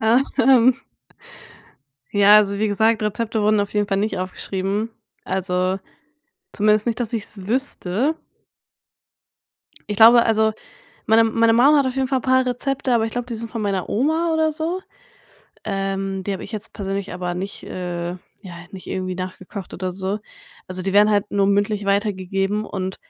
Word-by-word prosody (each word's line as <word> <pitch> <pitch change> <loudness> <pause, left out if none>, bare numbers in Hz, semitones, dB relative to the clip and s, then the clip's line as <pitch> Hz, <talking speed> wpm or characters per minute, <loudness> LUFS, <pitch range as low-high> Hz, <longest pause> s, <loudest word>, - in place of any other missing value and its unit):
Hm. 255 +1 +4 1.4
Ja, 205 +1 +7
also 200 -1 +2
wie 215 - +2
gesagt, 220 +2 +2
Rezepte 220 +1 -1
wurden 215 0 +3
auf 200 - -4
jeden 205 -1 0
Fall 195 -2 0
nicht 200 -1 -1
aufgeschrieben, 195 +3 -3 0.3
also 185 0 -1 0.7
zumindest 215 +1 +2
nicht, 235 0 -1
dass 240 -1 -3
ich 225 -3 -1
es 195 -3 -11
wüsste. 255 - 0 1.7
Ich 210 - -1
glaube, 230 +2 +8
also 220 -1 +2 0.5
meine 225 +1 +5
meine 225 0 +3
Mum 275 +6 +6
hat 280 - +3
auf 260 0 -2
jeden 265 -1 0
Fall 260 -1 0
paar 260 +1 +3
Rezepte, 255 +1 -2
aber 225 -1 +2
ich 225 - -5
glaube, 245 +1 -4
die 240 - -4
sind 225 0 -7
von 230 - -4
meiner 195 -3 -1
Oma 320 +8 +1
oder 315 0 +2
so. 330 +4 -3 0.8
Ähm, 195 -1 -2
die 200 - -1
habe 190 - -6
ich - - -9
jetzt 215 -1 -7
persönlich 195 -2 -4
aber 180 -1 -3
nicht 190 +3 -6
äh, 175 -1 -4 0.3
ja, 185 -4 -10 0.2
nicht 190 -2 -10
irgendwie 185 -1 -3
nachgekocht 185 +1 -7
oder 185 0 -4
so. 190 +3 -3 0.5
Also, 185 0 -4
die 195 - -2
werden 205 +2 +5
halt 205 -1 +1
nur 200 -1 +2
mündlich 205 +1 +1
weitergegeben 200 0 0
und 190 -1 -4
210 Hz, 165 wpm, -21 LUFS, 195-230 Hz, 1.7 s, glaube